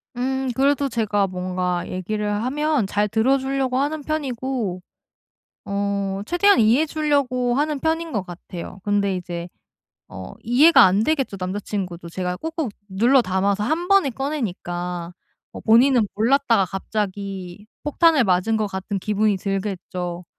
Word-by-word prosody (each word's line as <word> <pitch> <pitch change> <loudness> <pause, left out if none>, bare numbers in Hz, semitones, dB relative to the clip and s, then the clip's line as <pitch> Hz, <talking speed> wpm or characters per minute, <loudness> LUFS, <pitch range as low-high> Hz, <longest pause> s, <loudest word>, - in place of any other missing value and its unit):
음 265 +1 -1
그래도 280 +1 +2
제가 210 -4 0
뭔가 180 -1 -2
얘기를 210 +3 -3
하면 290 -2 0
잘 205 +1 +1
들어 225 +6 +2
주려고 265 -1 -1
하는 295 +3 -1
편이고, 260 - -3 0.8
어 200 -1 -2
최대한 400 - +4
이해해 235 +8 +4
주려고 280 -5 0
하는 295 +2 0
편인 325 +1 -1
것 210 -5 -1
같아요. 175 +1 -9
근데 200 -2 +1
이제 175 -1 -6 0.6
어 95 0 -9
이해가 270 +5 +6
안 190 +3 +3
되겠죠 270 -5 0
남자 185 +2 -3
친구도 180 -5 -5
제가 180 +1 -3
꼭꼭 320 - -3 0.2
눌러 235 +7 +4
담아서 195 +1 0
한 330 +9 -1
번에 395 -8 +4
꺼내니까. 180 - -4 0.4
뭐 - - -9
본인은 235 +1 +5
몰랐다가 230 -2 +3
갑자기 195 -1 -5 0.2
폭탄을 300 -2 +4
맞은 190 +3 +2
것 215 -1 0
같은 195 +1 -4
기분이 210 +1 +1
들겠죠. 185 -3 -4
215 Hz, 295 characters per minute, -22 LUFS, 190-270 Hz, 0.8 s, 이해가